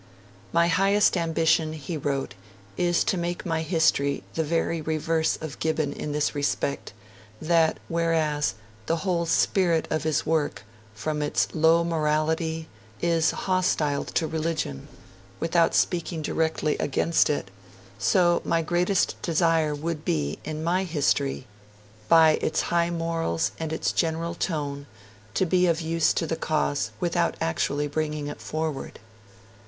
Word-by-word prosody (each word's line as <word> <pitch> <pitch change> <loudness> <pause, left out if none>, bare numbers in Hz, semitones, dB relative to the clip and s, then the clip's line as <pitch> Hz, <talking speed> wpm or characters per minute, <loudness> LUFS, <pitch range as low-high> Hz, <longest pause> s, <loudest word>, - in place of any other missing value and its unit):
'My 170 0 +3
highest 195 +5 +3
ambition,' 165 -2 +1
he 155 +2 -5
wrote, 140 -4 -2 0.4
'is 175 -1 +2
to 185 - 0
make 175 0 -3
my 165 -2 0
history 155 -4 +1
the 160 - 0
very 165 +1 -1
reverse 160 +1 0
of 155 -2 -7
Gibbon 155 -2 0
in 150 - -5
this 150 0 0
respect, 145 -1 -2 0.5
that 165 0 +2
whereas 160 -4 0 0.3
the 165 - +2
whole 170 -3 0
spirit 170 -1 +2
of 155 - 0
his 155 0 0
work, 155 -2 0 0.3
from 150 +7 -2
its 145 - +1
low 165 +1 +4
morality, 160 0 0 0.3
is 165 -2 +2
hostile 170 -6 0
to 165 - -1
religion, 155 - -3 0.5
without 165 0 +2
speaking 170 -2 0
directly 160 -1 0
against 160 +4 +2
it, 145 -10 -2 0.5
so 175 - +3
my 165 0 +1
greatest 180 +4 +1
desire 165 -2 +2
would 155 +1 -4
be, 75 -2 -1
in 155 0 -5
my 180 +3 +1
History, 145 -6 0 0.6
by 160 -2 +6
its 155 - 0
high 170 0 +3
morals 165 - -1
and 160 -1 -3
its 160 - 0
general 165 0 -1
tone, 145 -4 -3 0.5
to 190 - +2
be 180 +1 +3
of 165 -1 +2
use 165 0 +1
to 165 - -1
the 165 - -2
cause 150 -3 -1
without 175 -1 0
actually 140 - 0
bringing 150 0 -2
it 145 - -7
forward.' 155 -3 -4
160 Hz, 135 wpm, -26 LUFS, 150-170 Hz, 0.6 s, by